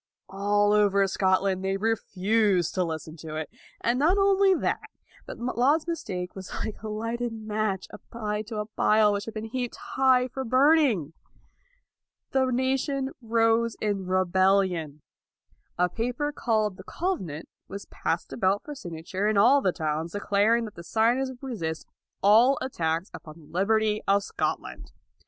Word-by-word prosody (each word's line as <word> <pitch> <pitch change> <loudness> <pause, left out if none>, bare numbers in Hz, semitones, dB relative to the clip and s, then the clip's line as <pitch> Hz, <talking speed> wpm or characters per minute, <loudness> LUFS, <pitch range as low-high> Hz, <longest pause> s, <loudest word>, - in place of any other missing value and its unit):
All 205 +1 +2
over 200 -1 +4
Scotland, 190 0 +1
they 195 0 0
refused 205 -3 +1
to 185 - +1
listen 160 -1 -5
to 155 0 -8
it. 155 0 -5 0.3
And 240 +2 +1
not 335 +7 +3
only 390 -1 +4
that, - - -1 0.5
but - - -7
Laud's 255 +6 +1
mistake 180 - -4
was 190 -1 -8
like 215 - -7
a 220 - -6
lighted 230 +3 -3
match 215 -3 -2
applied 210 -2 -5
to 220 -2 -5
a 210 - -2
pile 215 0 +3
which 200 0 -3
had 225 - -8
been 215 0 -4
heaped 250 -1 -3
high 260 -1 +2
for 265 +1 -5
burning. 255 - +3 1.2
The 270 - +2
LAUD 260 -2 +1
229 260 0 +1
nation 270 0 -1
rose 225 0 +2
in 200 -3 -2
rebellion. 185 -4 +1 0.7
A 180 - +3
paper 245 - -2
called 215 -7 0
the - - -10
Covenant 185 - -4 0.2
was 200 0 -7
passed 165 - -3
about 195 -1 +1
for 295 - -7
signa 170 - -8
ture 190 +4 -2
in 215 -1 +1
all 255 +8 +6
the 185 - +2
towns, 160 0 -3
declaring 205 +3 +2
that 215 - -9
the 170 - -10
signers 235 +8 +1
would 260 0 -11
resist 165 -12 -4 0.4
all 230 +7 +6
attacks 165 -7 -2
upon 155 -1 -10
the 160 - -16
liberty 215 +5 +1
of 200 +1 +3
Scotland. - - -4
210 Hz, 160 wpm, -26 LUFS, 185-245 Hz, 1.2 s, all